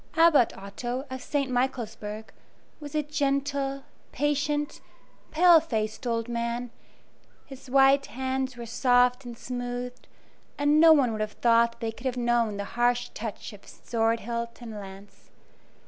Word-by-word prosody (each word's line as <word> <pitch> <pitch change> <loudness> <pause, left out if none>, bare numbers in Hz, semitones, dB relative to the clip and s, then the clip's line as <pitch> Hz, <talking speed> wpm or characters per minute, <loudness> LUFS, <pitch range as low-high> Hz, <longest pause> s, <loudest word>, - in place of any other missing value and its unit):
Abbot 325 -8 +5
Otto, 240 +7 -5
of 260 -1 -5
St. 280 -3 -2
Michaelsburg, 220 -4 -3 0.5
was 295 -1 -8
a 305 - +1
gentle, 280 -1 -1 0.3
patient, 295 +1 -1 0.5
pale 345 +1 +6
faced 220 -6 -3
old 230 -1 -1
man; 235 0 -3 0.7
his 270 -1 -12
white 275 +1 +4
hands 260 0 -3
were 235 - -6
soft 245 +2 +2
and 240 -1 -8
smooth, 245 0 -5 0.6
and 290 +1 +3
no 325 0 +8
one 275 -6 +4
would 215 -1 -3
have 215 0 -3
thought 235 0 +3
that 235 - -28
they 225 -1 -2
could 235 +4 -6
have 250 -1 -2
known 235 -3 +1
the 200 - -3
harsh 240 0 +1
touch 220 -1 -6
of 200 - -15
sword 225 0 -1
hilt 235 +1 -4
and 235 -2 -8
lance. 200 -1 -11
245 Hz, 145 wpm, -27 LUFS, 230-275 Hz, 0.7 s, no